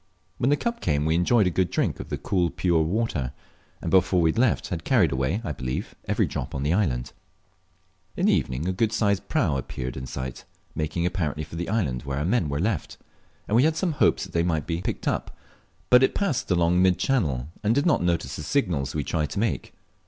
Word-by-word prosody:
When 125 - +2
the 145 - +3
cup 235 +6 -3
came 75 -3 +1
we 80 - +2
enjoyed 95 +6 +3
a 90 - +1
good 90 +1 +1
drink - - -1
of - - -7
the - - -2
cool 90 -4 0
pure 85 0 +1
water, 80 - -1 0.5
and - - -2
before 95 -1 +4
we 80 -2 +4
left 120 0 +1
had 85 -4 -4
carried - - +3
away, 70 - 0
I - - -3
believe, 65 -2 -4
every - - +1
drop - - -5
on 70 - -2
the 75 +3 +1
island. 65 - 0 1.0
In - - +1
the - - +5
evening 65 +7 -1
a - - +1
good 110 +4 +1
sized 100 -3 0
prau 95 - +1
appeared 65 -1 -5
in 65 0 -6
sight, 65 0 -6 0.3
making 80 +2 -2
apparently 80 -4 -1
for 80 - -9
the 85 +2 -3
island 80 - 0
where 70 0 -4
our 75 - -1
men 95 -5 +1
were 70 0 -2
left, 100 +4 -2 0.5
and 105 - +1
we 120 - +6
had 155 +3 +3
some 180 0 +1
hopes 150 - +2
they 85 - -1
might 80 -3 0
be 85 - -3
seen - - -4
and 90 - -9
picked - - -3
up, - - -2 0.5
but 125 0 +8
it 130 - +3
passed 195 -11 -1
along 90 0 +3
mid 90 -2 +4
channel, 75 - 0
and 110 +2 +2
did 140 - +2
not 170 - +3
notice 85 -6 -1
the - - -5
signals 80 - -1
we 75 - 0
tried 75 0 -1
to 100 - -3
make. 100 - -1
85 Hz, 225 wpm, -25 LUFS, 75-105 Hz, 1.0 s, but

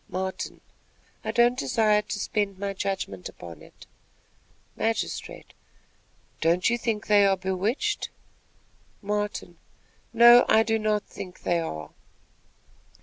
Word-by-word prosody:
Martin. 190 +1 -4 0.6
"I - - -4
don't 240 +1 +3
desire 210 +9 +2
to 210 - -5
spend 205 -1 -2
my 200 0 -3
judgment 190 - -4
upon 85 -3 -11
it." - - -16 0.9
Magistrate. 225 0 -3 0.9
"Don't 170 +6 +2
you - - +2
think 225 -3 -2
they 205 -1 +5
are 195 -1 +3
bewitched?" 205 - -1 0.9
Martin. 205 -4 -3 0.5
"No; 235 +1 +8
I 220 0 +5
do 225 0 0
not 215 -1 0
think 185 -2 -10
they 175 -1 +1
are." 80 - -5
205 Hz, 115 wpm, -26 LUFS, 185-225 Hz, 0.9 s, No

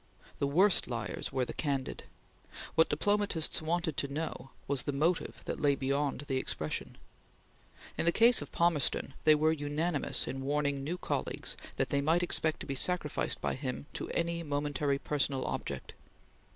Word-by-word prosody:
The 140 - +1
worst 185 +8 +5
liars 115 -6 -4
were 130 -1 0
the - - -6
candid. 140 -3 -2 0.7
What 160 - +5
diplomatists 200 -1 +1
wanted 160 -1 -1
to 140 - -1
know 140 -3 -4 0.2
was 140 -2 +1
the 145 - -2
motive 160 +5 0
that - - -3
lay 145 -1 +3
beyond 140 +1 -1
the 135 -2 -2
expression. 75 -11 -3 1.0
In - - +2
the 170 - +5
case 230 +5 +5
of - - -8
Palmerston 165 -5 +1
they 155 -1 +8
were 155 +1 +3
unanimous 150 +1 0
in 135 - -4
warning 140 0 0
new 170 +6 -2
colleagues - - -2 0.2
that - - 0
they 140 - +1
might 165 +5 +3
expect 160 -2 +1
to - - -4
be 140 - -3
sacrificed 150 +2 +1
by - - 0
him 130 0 -4
to - - -4
any 170 0 -1
momentary 145 -2 0
personal 140 -2 -1
object. - - -4
145 Hz, 165 wpm, -32 LUFS, 140-165 Hz, 1.0 s, they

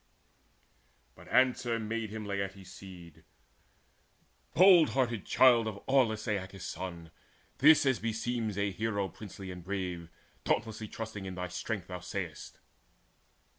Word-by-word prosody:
But - - -16
answer 125 -2 +2
made 110 +1 -3
to 105 - -8
him 110 -1 -5
Laertes' 100 -2 -4
seed: 90 -4 -12 1.3
"Bold 180 -2 +7
hearted 120 -6 0
child 120 -3 +5
of 105 -2 -4
aweless 115 -5 +2
Aeacus' 95 -2 -3
son, 85 -2 -6 0.5
This 150 +1 +7
as 130 -3 +2
beseems 115 -1 -2
a 100 0 0
hero 100 -1 -2
princely 95 0 -9
and 90 -1 -9
brave, 90 -3 -4 0.3
Dauntlessly 110 -1 -1
trusting 110 -3 -6
in 95 -1 -6
thy 90 -1 -4
strength, 95 +2 -4
thou 90 -1 -6
say'st. 90 -4 -6
105 Hz, 130 wpm, -31 LUFS, 95-115 Hz, 1.3 s, Bold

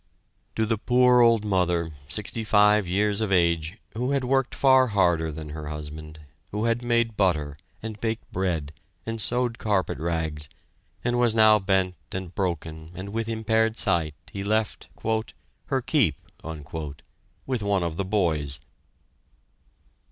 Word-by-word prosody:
To 110 - +1
the 110 -1 0
poor 125 +1 +5
old 115 -2 +4
mother, 90 -4 +1 0.2
sixty 105 +6 -3
five 105 -2 +4
years 100 +3 +1
of 110 -3 -1
age, 85 0 +2 0.2
who 125 +5 -1
had 140 -2 +1
worked 135 0 +1
far 130 -1 +5
harder 85 -6 +2
than 75 0 -7
her 75 0 -6
husband, 75 +1 -7 0.3
who 105 +2 -2
had 115 +1 +1
made 115 -2 +1
butter, 75 -8 +1 0.3
and 110 -2 -6
baked 115 0 -3
bread, 85 -6 -1 0.3
and 115 -1 -3
sewed 120 +1 0
carpet 100 -9 0
rags, 80 -2 -2 0.5
and 120 0 +1
was 120 -2 +3
now 110 -1 +6
bent 95 -1 +1 0.2
and 95 -2 -5
broken, 80 -4 -3
and 95 +2 -6
with 115 +2 -3
impaired 110 0 +1
sight, 85 -7 +1 0.2
he 100 - -4
left: 110 +1 -1 0.8
"her - - 0
keep" - - +3 1.3
with 130 -4 -1
one 100 -3 +1
of 85 -1 -3
the 100 - -1
boys! 80 -8 0
100 Hz, 145 wpm, -26 LUFS, 85-115 Hz, 1.3 s, now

